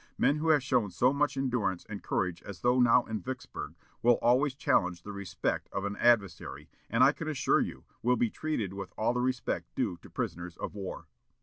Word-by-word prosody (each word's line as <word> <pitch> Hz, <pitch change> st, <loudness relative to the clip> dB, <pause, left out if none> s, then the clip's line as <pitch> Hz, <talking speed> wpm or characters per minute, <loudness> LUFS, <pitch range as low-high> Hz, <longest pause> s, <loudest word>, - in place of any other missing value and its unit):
Men 145 Hz, -, +3 dB
who 160 Hz, +2 st, 0 dB
have 150 Hz, -4 st, +5 dB
shown 120 Hz, -5 st, +1 dB
so 120 Hz, +9 st, +2 dB
much 145 Hz, 0 st, +1 dB
endurance 120 Hz, -9 st, -1 dB
and 100 Hz, -2 st, -6 dB
courage 90 Hz, -2 st, -1 dB
as 100 Hz, -3 st, -9 dB
those 125 Hz, +1 st, +3 dB
now 120 Hz, +1 st, +5 dB
in 110 Hz, -2 st, -4 dB
Vicksburg 90 Hz, -, -6 dB, 0.3 s
will 120 Hz, 0 st, +5 dB
always 130 Hz, +3 st, +3 dB
challenge 90 Hz, -, +1 dB
the 105 Hz, -, -7 dB
respect 100 Hz, -2 st, -3 dB
of 100 Hz, -, -3 dB
an 100 Hz, 0 st, -2 dB
adversary, 115 Hz, -5 st, +1 dB, 0.2 s
and, 115 Hz, +3 st, +4 dB
I 135 Hz, -, +7 dB
can 160 Hz, +1 st, -7 dB
assure 150 Hz, -4 st, +2 dB
you, -, -, -4 dB, 0.2 s
will 125 Hz, +1 st, +2 dB
be 115 Hz, -1 st, +1 dB
treated 120 Hz, -12 st, -2 dB
with 100 Hz, -2 st, -6 dB
all 110 Hz, +2 st, +1 dB
the 125 Hz, -, 0 dB
respect 125 Hz, -, -2 dB
due 90 Hz, -, -1 dB
to -, -, -15 dB
prisoners 85 Hz, 0 st, -4 dB
of -, -, -5 dB
war." 100 Hz, -2 st, -6 dB
115 Hz, 205 wpm, -30 LUFS, 95-130 Hz, 0.3 s, I